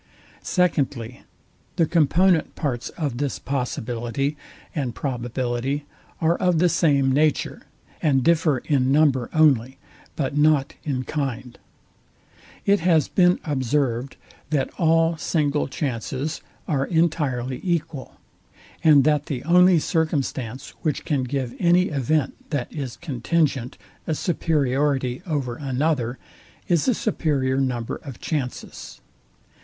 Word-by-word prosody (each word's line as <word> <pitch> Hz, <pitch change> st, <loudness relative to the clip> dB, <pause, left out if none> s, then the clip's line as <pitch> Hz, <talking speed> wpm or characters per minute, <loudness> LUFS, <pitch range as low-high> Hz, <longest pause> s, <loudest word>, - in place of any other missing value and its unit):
Secondly, 135 Hz, -, 0 dB, 0.5 s
The 165 Hz, -, +3 dB
component 170 Hz, +2 st, +3 dB
parts 125 Hz, -6 st, -2 dB
of 140 Hz, -7 st, -4 dB
this 140 Hz, -2 st, -1 dB
possibility 125 Hz, +1 st, -2 dB, 0.4 s
and 130 Hz, -7 st, -3 dB
probability 125 Hz, +2 st, -2 dB, 0.3 s
are 165 Hz, +1 st, +2 dB
of 180 Hz, -2 st, +2 dB
the 175 Hz, +2 st, +4 dB
same 145 Hz, -5 st, +3 dB
nature, 150 Hz, +2 st, 0 dB, 0.3 s
and 135 Hz, -5 st, +2 dB
differ 160 Hz, -2 st, +3 dB
in 135 Hz, -3 st, +2 dB
number 140 Hz, -4 st, +3 dB
only, 135 Hz, -5 st, +3 dB, 0.4 s
but 140 Hz, -2 st, -2 dB
not 150 Hz, -2 st, +3 dB
in 130 Hz, -4 st, -2 dB
kind. 130 Hz, -3 st, -4 dB, 1.1 s
It 200 Hz, 0 st, +4 dB
has 165 Hz, -3 st, +3 dB
been 180 Hz, -1 st, +3 dB
observed, 135 Hz, -3 st, -1 dB, 0.3 s
that 145 Hz, -4 st, 0 dB
all 165 Hz, 0 st, +3 dB
single 150 Hz, -2 st, 0 dB
chances 135 Hz, +2 st, -3 dB, 0.3 s
are 135 Hz, -3 st, 0 dB
entirely 145 Hz, -7 st, 0 dB
equal, 165 Hz, -6 st, -3 dB, 0.7 s
and 150 Hz, -4 st, +7 dB
that 150 Hz, 0 st, +2 dB
the 130 Hz, -5 st, -4 dB
only 180 Hz, +1 st, +5 dB
circumstance, 140 Hz, -, -2 dB
which 155 Hz, -4 st, -2 dB
can 140 Hz, -5 st, 0 dB
give 130 Hz, -2 st, -3 dB
any 180 Hz, +1 st, +4 dB
event, 145 Hz, 0 st, -1 dB
that 145 Hz, -6 st, -3 dB
is 135 Hz, -6 st, -5 dB
contingent, 140 Hz, -3 st, -1 dB, 0.3 s
a 160 Hz, -, 0 dB
superiority 140 Hz, -5 st, 0 dB
over 135 Hz, -7 st, -2 dB
another 135 Hz, -2 st, -1 dB, 0.5 s
is 170 Hz, -, +2 dB
a 250 Hz, -, +3 dB
superior 140 Hz, -11 st, 0 dB
number 120 Hz, -3 st, -2 dB
of 135 Hz, -5 st, -10 dB
chances. 140 Hz, -6 st, -5 dB
145 Hz, 115 wpm, -23 LUFS, 130-160 Hz, 1.1 s, and